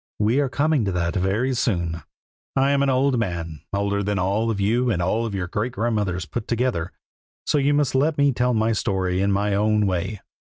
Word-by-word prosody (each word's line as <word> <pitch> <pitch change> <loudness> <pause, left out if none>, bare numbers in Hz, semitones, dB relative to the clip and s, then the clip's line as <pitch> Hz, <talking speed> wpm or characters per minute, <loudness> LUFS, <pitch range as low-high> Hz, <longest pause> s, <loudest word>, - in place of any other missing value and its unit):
we 110 +6 +2
are 140 -2 +1
coming 145 -1 +1
to 100 - -1
that 85 -2 -1
very 105 +8 0
soon. 85 -9 -1 0.5
I 135 +1 +3
am 140 -1 +2
an 140 - +2
old 130 -1 +2
man, 85 -7 -4
older 100 0 0
than 100 0 -1
all 100 +5 0
of 110 -3 -2
you 120 +5 +1
and 100 -7 0
all 110 +6 0
your 95 -2 -2
great 105 +7 -3
grandmothers 105 -6 -1
put 120 -3 -5
together, 120 -8 -1 0.5
so 150 - +2
you 145 +1 +2
must 145 -3 +1
let 145 +4 +2
me 140 0 +4
tell 125 -1 +1
my 110 +1 +2
story 95 -3 0
in 100 +1 +2
my 100 +1 +1
own 105 +1 +2
way. 95 +2 -2
110 Hz, 205 wpm, -23 LUFS, 95-125 Hz, 0.5 s, me